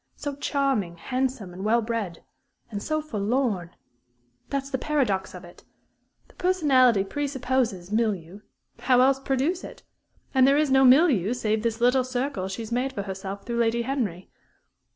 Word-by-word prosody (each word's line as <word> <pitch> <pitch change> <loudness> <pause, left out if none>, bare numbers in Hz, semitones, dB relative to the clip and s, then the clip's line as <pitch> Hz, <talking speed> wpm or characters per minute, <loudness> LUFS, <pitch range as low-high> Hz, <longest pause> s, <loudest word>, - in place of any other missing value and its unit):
So 285 -1 -5
charming, 270 - -1
handsome, 250 -3 -3
and 185 +2 -7
well 230 +2 +2
bred 215 -7 -4 0.5
and 205 -1 -4
so 310 +4 -2
forlorn! 215 - -1 0.7
That's 275 0 -3
the 265 - -1
paradox 235 -13 -1
of 180 0 -10
it. 175 - -16 0.6
The - - -22
personality 270 - +3
presupposes 260 -6 -2
a - - -4
milieu 200 -5 -1 0.4
else 260 +1 +4
how - - -21
produce 275 +7 -1
it? - - -10 0.5
And 260 -1 +5
there 280 +1 +4
is 300 -2 +2
no 265 0 +5
milieu, 255 - +5
save 220 -3 -1
this 230 0 -2
little 250 +2 +4
circle 255 -6 -3
she 195 +4 -5
has 220 - -9
made 255 +3 -1
for 200 - -4
herself 195 0 -6
through 235 0 -2
Lady 235 0 +1
Henry.... 230 -9 -3
245 Hz, 160 wpm, -25 LUFS, 200-270 Hz, 0.7 s, And